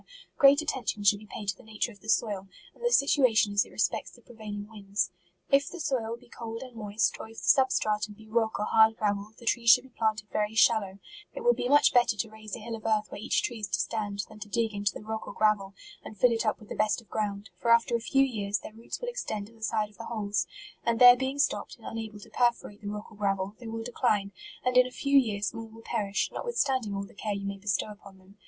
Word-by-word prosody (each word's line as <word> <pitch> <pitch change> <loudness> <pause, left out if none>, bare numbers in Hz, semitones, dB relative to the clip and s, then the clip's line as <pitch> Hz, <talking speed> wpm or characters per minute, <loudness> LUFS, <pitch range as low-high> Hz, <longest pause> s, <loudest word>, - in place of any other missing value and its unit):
great 280 +2 +6
attention 250 -8 -2
should 205 0 +4
be 215 - -14
paid 210 - -6
to 195 - 0
the - - -17
nature 220 0 -3
of 205 - -17
the 220 - -11
soil, 205 -4 +1 0.3
and 485 - -17
the 480 - +2
sit 280 -7 +4
uation 220 -5 +4
as 205 - +4
it - - -15
respects - - -1
the 240 - -18
prevailing 210 -3 -7
winds. 200 -3 -2 0.4
If 275 0 +4
the 355 - -9
soil 235 -7 -1
be 245 - -19
cold 230 0 -7
and 255 -2 -12
moist, 210 -1 0
or - - -7
if 225 0 -15
the - - -8
sub 265 -1 +5
stratum 210 0 0
be 220 +1 -16
rock 220 0 0
or 210 - 0
hard 220 +1 +5
gravel, 205 -1 -1
the 235 - -14
trees 230 0 +2
should 250 +2 +8
be 265 - -16
planted 220 -2 0
very 210 +1 0
shallow 225 -2 +5
r: 190 +1 -14 0.4
it - - -5
will 485 +1 +5
be 245 - -2
much 290 +1 +5
better 240 -3 +4
to 220 +2 -2
raise 215 -1 -8
a - - -8
hill 230 +1 -5
of 220 - -10
earth 215 -1 0
where 200 - -7
each - - +1
tree 240 -2 -3
is 210 - -3
to 180 -2 -1
stand, 205 -3 -2
than 210 - -14
to 210 0 -8
dig 225 0 0
into 200 -1 0
the - - -9
rock 220 0 -5
or - - -6
gravel, 205 -2 +1 0.3
and 215 - -10
fill 250 +4 +5
it 230 -1 0
up - - 0
with 215 - -15
the - - -5
best 215 +2 +1
of 230 - -18
ground; 205 -2 -3
for 235 - -1
after 230 +1 +5
a - - +1
few 270 +4 +3
years 210 -5 -1
their - - -10
roots 225 +1 -7
will - - -5
extend 220 - -3
to 225 - -17
the 225 - -21
sides 215 -1 -1
of 205 - -23
the 230 - -6
holes, 205 -6 -1 0.4
and 235 -1 +1
there 245 +1 +10
being 265 +2 -2
stopped, 285 - 0
and - - -17
unable 220 -2 -6
to 220 +2 -14
perforate 235 -3 0
the 205 - -7
rock 210 +2 -6
or 215 - -15
gravel, 195 0 -1
they 240 - -9
will 225 0 -4
decline, 215 -4 0 0.3
and 250 0 +2
in 255 0 +7
a - - -10
few 280 +2 -1
years 210 -6 +3
more 225 0 -7
will 225 +1 -14
perish, 205 -4 -1
notwithstanding 270 - -1
all 195 0 -3
the - - -16
care 205 0 -3
you 200 0 -5
may 200 0 -4
bestow 200 +1 -1
upon 200 -2 -14
them. 190 +2 -21
220 Hz, 270 wpm, -28 LUFS, 205-235 Hz, 0.4 s, there